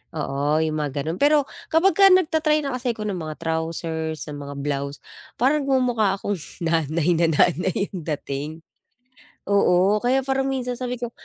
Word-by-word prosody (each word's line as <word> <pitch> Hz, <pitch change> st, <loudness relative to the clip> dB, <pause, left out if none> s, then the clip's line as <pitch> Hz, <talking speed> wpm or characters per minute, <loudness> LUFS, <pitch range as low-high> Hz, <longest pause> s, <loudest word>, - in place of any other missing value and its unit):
Oo, 150 Hz, +1 st, 0 dB
yung 155 Hz, -1 st, -1 dB
mga 145 Hz, -1 st, -2 dB
ganun. 165 Hz, +3 st, -4 dB
Pero 290 Hz, 0 st, +4 dB, 0.2 s
kapag 345 Hz, +2 st, +4 dB
ka 390 Hz, +4 st, +6 dB
nagta-try 315 Hz, -4 st, +3 dB
na 275 Hz, -, -2 dB
kasi 250 Hz, -2 st, -2 dB
ako 215 Hz, -, -6 dB
ng 195 Hz, -4 st, -3 dB
mga 155 Hz, -1 st, -5 dB
trousers, 160 Hz, -1 st, -3 dB
ng 145 Hz, -, -7 dB
mga 140 Hz, -, -7 dB
blouse, 140 Hz, 0 st, -3 dB, 0.4 s
parang 275 Hz, +5 st, +2 dB
nagmumukha 245 Hz, -7 st, +2 dB
akong 200 Hz, -2 st, -3 dB, 0.2 s
nanay 165 Hz, +1 st, +1 dB
na 170 Hz, -, +4 dB
nanay 180 Hz, +5 st, +1 dB
yung 185 Hz, -, -5 dB, 0.2 s
dating. 140 Hz, +2 st, -5 dB, 1.0 s
Oo, 200 Hz, 0 st, +4 dB
kaya 255 Hz, +4 st, +1 dB
parang 270 Hz, 0 st, -1 dB
minsan 250 Hz, -2 st, -2 dB
sabi 250 Hz, -1 st, -4 dB
ko, 240 Hz, -, -2 dB
195 Hz, 165 wpm, -23 LUFS, 160-260 Hz, 1.0 s, ka